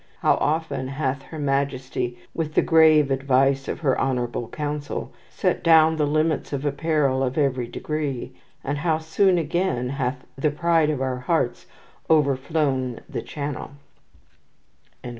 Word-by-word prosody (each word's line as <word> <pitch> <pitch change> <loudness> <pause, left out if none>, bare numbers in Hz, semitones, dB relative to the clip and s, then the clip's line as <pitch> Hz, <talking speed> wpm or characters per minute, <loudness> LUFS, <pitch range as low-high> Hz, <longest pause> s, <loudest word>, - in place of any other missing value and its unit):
"How - - +4
often 155 -3 -1
hath 135 0 -2
her 160 - -10
majestie, 135 -3 -1 0.2
with 155 -2 -3
the - - +4
grave 155 -3 +5
advice 135 0 +2
of - - -4
her 135 -5 +1
honourable 120 -3 -1
Councell, 145 0 -4 0.2
sette - - -1
down 160 -1 +5
the 150 -1 +1
limits 155 +1 0
of 140 -1 -3
apparell 145 -2 +1
of 130 +1 -1
every 130 -5 +1
degree; 140 0 -4 0.3
and 140 +1 -2
how 160 0 +1
soon 175 +4 +2
again 160 -6 -1
hath 130 -1 -3
the 145 +3 +1
pride 165 0 +2
of 140 -3 -1
our 130 -1 -2
harts 125 -1 -1 0.4
overflown 140 -4 +1
the - - -4
chanell." 145 -2 -5
140 Hz, 140 wpm, -24 LUFS, 130-155 Hz, 0.4 s, grave